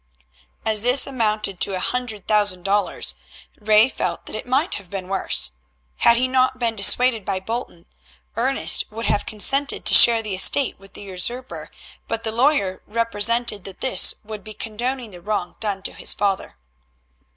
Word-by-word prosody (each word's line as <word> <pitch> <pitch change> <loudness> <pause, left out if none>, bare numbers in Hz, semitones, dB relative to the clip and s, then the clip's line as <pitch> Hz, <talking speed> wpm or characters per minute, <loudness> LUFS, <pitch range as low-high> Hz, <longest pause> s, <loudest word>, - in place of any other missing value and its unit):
As 215 -2 +2
this 250 +4 +4
amounted 215 -7 -2
to 195 - 0
a - - -3
hundred 225 -2 -4
thousand 205 -4 0
dollars, 200 +1 -1 0.5
Ray 215 +1 +4
felt - - -4
that - - -8
it - - -7
might 275 +7 +1
have 200 -3 -6
been 190 -1 -7
worse. 195 - 0 0.5
Had 235 - +4
he 255 +2 +1
not 255 0 +1
been 235 -2 -2
dissuaded 225 +2 +2
by 195 -1 -3
Bolton, 220 -4 -7 0.5
Ernest - - +1
would 225 +2 -6
have 205 - -1
consented 275 +6 +1
to - - +7
share 230 -1 +8
the 210 -2 -5
estate 245 +8 +4
with 195 0 -19
the - - -10
usurper, 205 +7 -4 0.4
but 230 0 -4
the 220 - -2
lawyer 235 -6 0
represented 230 -1 0
that 195 -2 -9
this 255 -8 +3
would 210 -1 -9
be 215 +1 -10
condoning 235 +2 -5
the 175 -2 -13
wrong 205 -2 -4
done 200 -3 -3
to - - -2
his - - +2
father. 195 - -3
215 Hz, 170 wpm, -21 LUFS, 195-245 Hz, 0.5 s, share